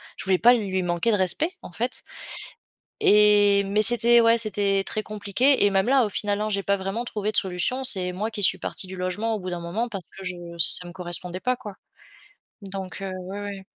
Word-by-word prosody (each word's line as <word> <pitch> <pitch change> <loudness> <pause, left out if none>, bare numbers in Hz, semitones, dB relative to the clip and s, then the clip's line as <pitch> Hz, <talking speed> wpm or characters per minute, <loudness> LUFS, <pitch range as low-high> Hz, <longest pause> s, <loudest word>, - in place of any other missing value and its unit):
je - - -9
voulais 190 -1 +1
pas 240 +2 +6
lui 195 -5 -2
manquer 175 +6 -1
de 210 - +2
respect, 190 - +3
en 175 - -11
fait 245 +3 -4 1.0
et 205 -1 +4
mais 205 +2 0
c'était, 240 +1 +5
ouais, 230 0 +4
c'était 200 -3 -1
très 215 - -4
compliqué 215 +7 +1
et 205 - +4
même 195 +2 0
là, 265 -1 +3
au - - -4
final, 205 +1 -2
hein, 215 - -2
j'ai 200 -1 -2
pas 200 - 0
vraiment 195 +5 -5
trouvé 210 -2 -3
de - - -2
solution. 195 +8 -1
C'est 185 -7 +5
moi 205 +5 -4
qui 210 -3 -4
suis - - +3
partie 190 - -2
du 190 - -9
logement 205 +5 -3
au - - -5
bout 185 -1 -7
d'un 175 -1 -5
moment 200 +8 -3
parce 195 -5 -8
que - - -10
je 185 -1 -4 0.2
ça 170 +2 +6
me 175 - -10
correspondait 180 0 -3
pas, 250 +5 -1
quoi, 210 -6 -11 0.9
donc 195 -1 -7
heu, 190 -1 -5
ouais, 200 +2 -7
ouais. 200 -1 -8
200 Hz, 220 wpm, -23 LUFS, 185-220 Hz, 1.0 s, pas